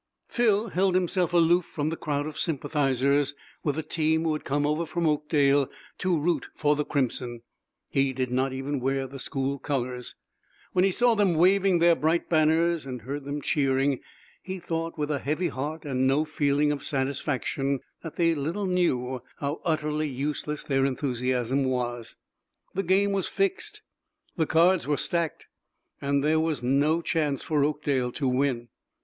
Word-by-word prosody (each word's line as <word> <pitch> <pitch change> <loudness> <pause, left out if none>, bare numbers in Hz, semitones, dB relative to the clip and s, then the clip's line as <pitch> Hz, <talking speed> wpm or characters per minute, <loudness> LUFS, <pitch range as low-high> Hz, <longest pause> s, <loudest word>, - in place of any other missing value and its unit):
Phil 225 -2 +2
held 185 0 +1
himself 180 -1 +1
aloof 175 +1 +4
from 150 -2 -3
the 165 - -2
crowd 145 -2 -2
of 155 0 -6
sympathizers 140 -2 +1 0.3
with 145 -3 0
the 160 - -2
team 160 0 +1
who 160 -1 +1
had 150 - -4
come 145 +1 0
over 150 +3 +1
from 170 +1 -2
Oakdale 145 -2 +2 0.3
to 185 -3 +1
root 165 +3 0
for 150 -1 +2
the 150 - 0
crimson; 125 -4 -2 0.4
he 135 0 +1
did 130 -1 -2
not 130 +1 +1
even 135 +2 -3
wear 135 +1 0
the 135 +1 -9
school 135 +2 -2
colors. 125 -3 -3 0.6
When 180 - +3
he 195 - +4
saw 240 +5 +3
them 205 -5 +2
waving 190 +2 +4
their 170 0 +5
bright 165 +2 0
banners 160 +1 +3
and 125 -4 -7
heard 140 +3 -5
them 145 0 -4
cheering 135 -1 +1 0.4
he 190 +1 -5
thought, 165 -1 -4
with 150 0 -1
a 145 - 0
heavy 155 +6 -1
heart 150 +4 -5
and 130 -2 +1
no 140 +4 +2
feeling 150 -1 +1
of 145 - -3
satisfaction, 140 0 -1 0.2
that 165 - -8
they 165 -1 +3
little 165 +7 -2
knew 130 -9 0 0.2
how 145 +2 -3
utterly 155 -1 0
useless 150 +2 -3
their 135 -1 +1
enthusiasm 130 -1 0
was. 120 -3 -2 0.6
The 195 - 0
game 195 +2 +2
was 195 -2 0
fixed; 390 0 -2 0.5
the 160 -4 0
cards 170 +2 +3
were 145 -1 +1
stacked, 170 -2 -2 0.6
and 140 0 +1
there 155 +1 +3
was 160 -5 -1
no 145 +6 +2
chance 150 -4 0
for 150 -3 +1
Oakdale 145 -4 0
to 140 - -1
win. 125 -2 0
150 Hz, 165 wpm, -27 LUFS, 135-165 Hz, 0.6 s, their